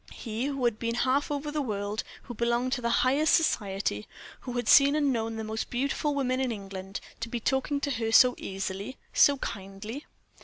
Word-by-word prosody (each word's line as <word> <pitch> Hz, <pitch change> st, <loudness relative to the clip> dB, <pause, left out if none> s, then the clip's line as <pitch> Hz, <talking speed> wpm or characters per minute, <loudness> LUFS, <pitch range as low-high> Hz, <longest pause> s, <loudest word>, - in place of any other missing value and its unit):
He, 230 Hz, +1 st, -4 dB
who 275 Hz, -3 st, -2 dB
had 230 Hz, -2 st, +1 dB
been 230 Hz, 0 st, -1 dB
half 260 Hz, +4 st, +1 dB
over 295 Hz, 0 st, -3 dB
the 300 Hz, 0 st, -1 dB
world, 205 Hz, -3 st, -3 dB, 0.2 s
who 245 Hz, -, -8 dB
belonged 235 Hz, +2 st, 0 dB
to 260 Hz, -, -1 dB
the 235 Hz, -, 0 dB, 0.2 s
highest 285 Hz, +5 st, +4 dB
society, 195 Hz, -, 0 dB, 0.3 s
who 250 Hz, -, -7 dB
had 245 Hz, 0 st, -2 dB
seen 280 Hz, 0 st, +7 dB
and 290 Hz, -3 st, +2 dB
known 225 Hz, -1 st, -2 dB
the 220 Hz, -, -4 dB
most 220 Hz, +1 st, -4 dB
beautiful 280 Hz, +3 st, -1 dB
women 260 Hz, -2 st, 0 dB
in 260 Hz, -2 st, 0 dB
England, 195 Hz, -2 st, -6 dB, 0.2 s
to 230 Hz, -, -4 dB
be 240 Hz, -, -3 dB
talking 265 Hz, +4 st, 0 dB
to 285 Hz, -, -1 dB
her 225 Hz, -3 st, -1 dB
so 250 Hz, +2 st, +7 dB
easily, 195 Hz, +5 st, -5 dB, 0.2 s
so 285 Hz, -1 st, +5 dB
kindly. 205 Hz, +5 st, -6 dB
240 Hz, 195 wpm, -28 LUFS, 215-275 Hz, 0.3 s, seen